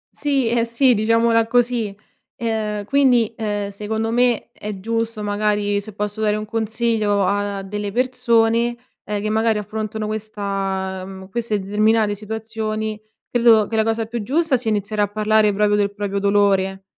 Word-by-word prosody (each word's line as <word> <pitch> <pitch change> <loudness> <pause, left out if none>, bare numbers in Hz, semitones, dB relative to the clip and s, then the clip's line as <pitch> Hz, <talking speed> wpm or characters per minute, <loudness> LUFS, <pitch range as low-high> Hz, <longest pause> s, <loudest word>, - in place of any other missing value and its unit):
Sì, 275 -4 0
eh 230 0 +2
sì, 245 +2 +3
diciamola 230 +1 +3
così. 235 -4 +1 0.4
Ehm, 215 -2 -2
quindi, 250 -3 +3
ehm, 205 -2 -3
secondo 220 +2 -3
me 245 -1 +1
è 210 -2 -7
giusto, 230 +1 -2
magari 205 0 0
se 215 +1 -10
posso 210 +1 -4
dare 210 -1 +2
un 215 0 -4
consiglio 220 -2 0
a 200 0 -1
delle 205 +1 -4
persone, 240 -1 +2 0.3
ehm, 210 -1 -2
che 215 - -2
magari 220 0 +2
affrontano 215 +1 -4
questa 195 -3 -3
mhmm, 190 0 -10
queste 225 -2 -1
determinate 210 +2 +2
situazioni, 215 0 -4 0.3
credo 230 -3 +5
che 225 - -5
la 220 - +3
cosa 225 0 0
più 230 +1 -4
giusta 290 +6 +1
sia 240 -2 -1
iniziare 210 0 -1
a 205 - +3
parlare 215 +1 +2
proprio 205 +1 +2
del 200 -1 +1
proprio 200 -1 -3
dolore. 195 -1 +2
215 Hz, 155 wpm, -21 LUFS, 205-230 Hz, 0.4 s, credo